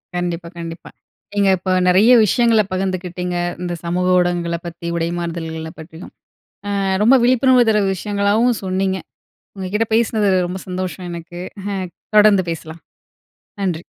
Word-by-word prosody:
கண்டிப்பா, 175 -1 -3
கண்டிப்பா. 165 0 -7 0.4
நீங்க 200 -1 +2
இப்ப 185 +1 -3 0.2
நெறைய 200 +7 +5
விஷயங்களை 230 +1 +3
பகிர்ந்துகிட்டிங்க. 180 -1 -3 0.3
இந்த 175 -1 -3
சமூக 180 +2 -1
ஊடகங்களை 175 -1 0
பத்தி, 170 0 -8
உடை 165 0 -1
மாறுதல்களை 160 -2 -5
பத்தியும். 160 +2 -11 0.7
அ - - 0 0.2
ரொம்ப 250 +5 +6
விழிப்புணர்வு 255 -1 +4
தர 210 -1 +3
விஷயங்களாவும் 205 +5 +1
சொன்னீங்க. 190 0 -1 0.6
உங்க 190 -1 -4
கிட்ட 225 +1 +1
பேசினது 220 -3 +2 0.2
ரொம்ப 185 +1 -5
சந்தோஷம் 180 -1 -4
எனக்கு. 170 +1 -8 0.8
தொடர்ந்து 205 -3 +5
பேசலாம், 160 0 -8 0.8
நன்றி. 175 -3 -2
185 Hz, 125 wpm, -19 LUFS, 170-205 Hz, 0.8 s, ரொம்ப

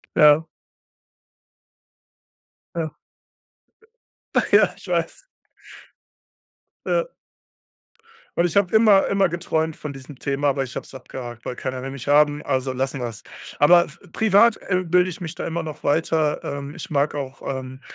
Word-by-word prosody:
Ja. 150 +1 +6 2.3
Ja. 160 -2 -2 1.6
Ja, - - +5
ich - - -14
weiß. - - -2 1.6
Ja. - - 0 1.3
Und 170 - +4
ich 175 - -4
habe 200 -3 +3
immer 210 -3 +5
immer 195 -2 +3
geträumt 160 -2 -1
von 150 - -7
diesem 135 +1 -11
Thema. 140 +2 -2
Aber 135 -1 +1
ich 130 - -7
habe - - -4
es - - -14
abgehakt, 120 -3 -8
weil 125 - -5
keiner 130 -1 -4
will 135 - -5
mich 135 0 -8
haben. 145 0 +4
Also 130 -1 -1
lassen 135 +1 -2
wir 120 - -2
es. 110 -2 -10 0.3
Aber 175 +4 +6 0.2
privat, 220 +1 +4
äh, 185 -1 +1
bilde 180 +2 +3
ich 175 - -9
mich 165 -3 -5
da - - -5
immer 165 0 -3
noch 155 -1 -8
weiter, 155 0 +1
ähm. 140 +1 -5
Ich 185 - -7
mag 145 -2 0
auch, 135 -2 -6
ähm 130 0 -5
150 Hz, 145 wpm, -23 LUFS, 135-175 Hz, 2.3 s, Ja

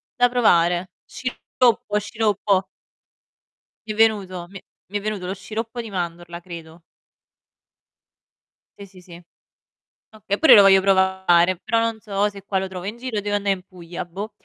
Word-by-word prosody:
da 245 0 +4
provare. 180 -7 +2
Sciroppo, 240 -4 -1
sciroppo. 205 -3 0 1.2
Mi 215 - -3
è - - -10
venuto, 195 -5 +1
mi 195 - -10
è - - -25 0.3
mi 205 - -2
è - - -11
venuto 210 -3 -4
lo 185 - -3
sciroppo 225 +4 -6
di 225 - -9
mandorla, 175 -2 -5
credo. 170 -2 -11 2.0
Sì 200 - -8
sì 185 -1 -17
sì. 175 -1 -14 0.9
Oka 210 -2 -4
pure 320 - +6
io - - +10
lo - - +9
voglio 195 0 +6
provare, 190 -2 +3
però 230 +5 0
non 230 -1 -1
so 205 -1 -1
se 200 -1 -11
qua 195 -1 -1
lo 190 0 -3
trovo 185 -1 -8
in 210 +4 -5
giro 250 -2 -5
o - - 0
devo 205 0 -1
anda' 205 0 -3
in 195 -2 0
Puglia, 180 -2 -8
boh. 195 +5 -7
195 Hz, 170 wpm, -22 LUFS, 180-215 Hz, 2.0 s, io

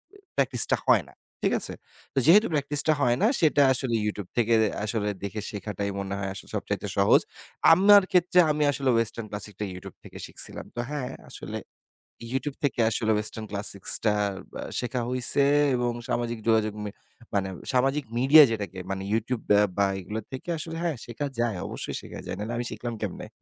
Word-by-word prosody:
এ - - -15 0.2
practice - - +5
টা - - +3
হয় - - +4
না। - - -20 0.3
ঠিক - - +2
আছে? - - 0 0.4
তো - - -12
যেহেতু 205 +8 +6
practice 145 0 +2
টা 155 - +5
হয় 120 -1 +2
না, 215 - +5
সেটা 150 -3 +4
আসলে 125 -2 -1
YouTube 100 -3 -4
থেকে 115 0 +2
দে 110 - +3 0.2
আসলে 105 -1 -1
দেখে 100 +2 -4
শেখাটাই 100 -1 -4
মনে 100 0 -4
হয় 95 -1 -3
আসলে 95 - -10
সবচাইতে - - -3
সহজ। - - +5 0.5
আমার 200 +2 +7
ক্ষেত্রে 180 0 +3
আমি 150 0 0
আসলে 135 -1 -1
western 115 -1 -2
classic 105 0 -2
টা 105 - -2
YouTube 90 - -10
থেকে - - -12
শিখছিলাম। - - -3
তো 120 - -5
হ্যাঁ 140 -4 -4 0.2
আসলে - - -7 0.8
YouTube 135 +1 -3
থেকে 135 -4 -1
আসলে 110 0 0
western 110 +1 -3
classic 100 -1 +1 0.2
টা 105 - +4 0.4
ব্য - - -7 0.2
শেখা 125 0 -3
হইছে 130 +2 +2 0.3
এবং 120 -1 0 0.2
সামাজিক 120 -1 -2
যোগাযোগ 110 -2 +2
মে 105 - -4 0.4
মানে 95 -1 0 0.2
সামাজিক 135 +3 +1
মিডিয়া 140 +5 +8
যেটাকে 100 -4 -4
মানে 95 0 -4
YouTube 115 +1 -2
ব্য 105 0 +6 0.2
বা 100 - +3
এগুলো 105 +4 -5
থেকে 130 +6 -7
আসলে 165 +1 -4
হ্যাঁ 165 -4 -1
শেখা 130 +5 -4
যায় 120 -5 0
অবশ্যই - - -3
শেখা - - -10
যায়। - - -5
নাহলে 110 +3 -4
আমি 120 - -3
শিখলাম 120 -1 -5
কেমনে? 100 -4 -5
120 Hz, 185 wpm, -26 LUFS, 105-140 Hz, 0.8 s, মিডিয়া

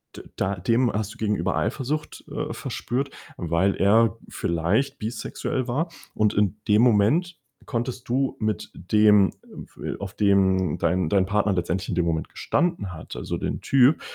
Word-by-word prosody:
d - - -8
da 100 +1 -1
dem 115 +6 +2
hast 105 -1 -2
du - - -17
gegenüber 105 -2 0
Eifersucht, 150 +4 -2
äh, - - -3
verspürt, 135 +4 -3 0.3
weil 85 +3 +1
er 110 +2 +4
vielleicht 85 +11 0
bisexuell 115 +3 -3
war, 155 +8 -1 0.2
und 105 -1 +2
in 105 0 +1
dem 105 +2 +5
Moment 125 - +3 0.3
konntest 120 0 -4
du 135 +2 +1
mit 110 -1 -2
dem, 105 +2 +4 0.5
äh, - - -3
f - - -8
auf 100 0 -6
den 95 -3 +2
dein 85 -1 +1
dein 95 -2 +3
Partner 105 +1 +1
letztendlich 90 +1 -2
in 95 - -1
dem 90 - +1
Moment 80 -1 -1
gestanden 165 - -1
hat, 80 - -9
also - - -4
den - - -3
Typ, 135 +3 +4
105 Hz, 160 wpm, -24 LUFS, 95-125 Hz, 0.5 s, dem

